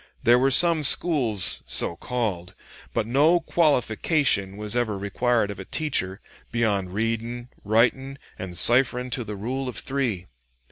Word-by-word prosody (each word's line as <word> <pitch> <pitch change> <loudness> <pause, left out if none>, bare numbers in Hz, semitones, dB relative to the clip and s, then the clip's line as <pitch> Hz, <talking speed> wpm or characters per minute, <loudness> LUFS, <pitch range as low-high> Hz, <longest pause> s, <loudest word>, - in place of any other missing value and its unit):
There 120 +1 +4
were 135 +2 +2
some 165 +3 +5
schools 130 - +4
so 85 - +1
called, 95 -6 -5 0.4
but - - -2
no 145 +9 +2
qualification 140 - 0
was 105 +1 -6
ever 115 -4 -2
required 105 +2 -1
of 100 - -10
a 95 - -8
teacher 105 - -2 0.3
beyond 105 -6 -1
'readin', 115 +4 -4
writin', 125 +6 0 0.2
and 90 -2 -7
cipherin' 125 +3 +3
to 125 -1 -3
the 105 -1 -8
Rule 130 +6 -5
of 115 - -9
Three.' 120 -8 -3
120 Hz, 140 wpm, -23 LUFS, 100-135 Hz, 0.4 s, some